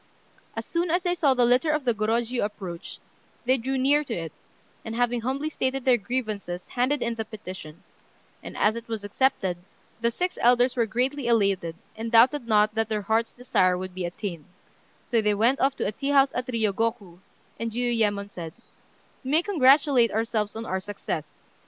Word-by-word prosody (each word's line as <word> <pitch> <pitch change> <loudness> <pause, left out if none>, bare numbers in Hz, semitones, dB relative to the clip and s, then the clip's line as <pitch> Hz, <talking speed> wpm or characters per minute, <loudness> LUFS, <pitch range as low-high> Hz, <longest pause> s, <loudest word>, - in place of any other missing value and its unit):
As - - -4
soon 340 +1 -1
as 350 +2 +1
they 355 -1 +1
saw 290 -6 +2
the 245 -1 +4
litter 250 +6 +3
of 305 -2 0
the 240 - +3
Gorôjiu 230 +3 0
approach, 190 -5 -6 0.5
they 255 +2 +4
drew 265 +3 -2
near 285 +3 +3
to 240 - -4
it, 165 -3 -5 0.5
and, 225 0 -5
having 245 0 +1
humbly 270 +5 -2
stated 270 -3 -2
their 250 -2 +4
grievances, 205 -6 -4
handed 255 +2 0
in 235 - -1
the 225 -1 -3
petition; 185 -7 -10 0.6
and - - -9
as 215 +1 +3
it 235 0 -7
was 225 -3 -4
accepted, 205 -4 0 0.4
the 235 0 +2
six 360 +9 -3
elders 245 +1 +4
were 235 -3 +1
greatly 255 +4 -1
elated, 195 -7 +1 0.2
and 225 +1 -5
doubted 240 +3 +5
not 215 -1 +3
that 225 0 -1
their 210 -2 -1
hearts' 225 +2 +1
desire 185 -7 +2
would 185 0 -6
be 185 -1 -3
attained; 175 -2 -5 0.6
so 230 -2 +2
they 210 -1 +2
went 235 +6 +2
off 270 0 +2
to - - -2
a - - 0
tea 275 +6 -4
house 275 -1 +5
at 250 +1 -3
Riyôgoku, 220 -5 -1 0.4
and 230 - -2
Jiuyémon 220 -4 0
said 165 -4 -7 0.7
"We 260 - -5
may 315 +4 +3
congratulate 275 - +4
ourselves 220 -1 -1
on 225 +1 -5
our 190 -2 -2
success. 190 -6 -5
230 Hz, 185 wpm, -26 LUFS, 205-260 Hz, 0.7 s, doubted